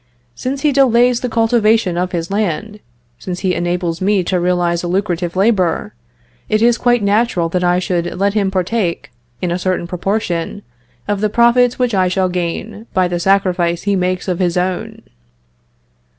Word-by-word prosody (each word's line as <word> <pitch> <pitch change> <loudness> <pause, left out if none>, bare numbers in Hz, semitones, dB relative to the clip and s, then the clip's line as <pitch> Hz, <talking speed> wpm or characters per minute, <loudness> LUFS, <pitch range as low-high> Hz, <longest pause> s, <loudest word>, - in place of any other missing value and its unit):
Since 265 - -4
he 300 - +3
delays 250 -3 +3
the 250 - -3
cultivation 225 -4 +2
of 180 +1 -1
his 170 0 -3
land, 210 +1 -2 0.4
since 180 -1 -5
he 185 -2 +1
enables 175 -1 -2
me 195 0 +2
to 180 +1 0
realize 175 -1 +1
a 175 - -4
lucrative 175 -2 -1
labor, 195 0 +1 0.6
it 215 - +2
is 235 +1 +3
quite 245 -3 +2
natural 200 -4 +1
that 180 +1 -1
I 175 0 +3
should 175 -1 -2
let 200 +1 +1
him 205 -3 +1
partake, 185 - -2 0.3
in 175 - 0
a 175 - -1
certain 185 -1 -1
proportion, 180 +1 -3 0.4
of 205 -1 -1
the 215 - +1
profits 235 +2 +3
which 250 -2 0
I 185 -2 +2
shall 185 0 0
gain 185 +5 -4
by 185 -1 +3
the 175 -1 -2
sacrifice 180 -2 +1
he 200 0 +1
makes 185 0 -1
of 180 -1 -1
his 180 -1 0
own." 180 0 -3
185 Hz, 170 wpm, -17 LUFS, 175-215 Hz, 0.6 s, he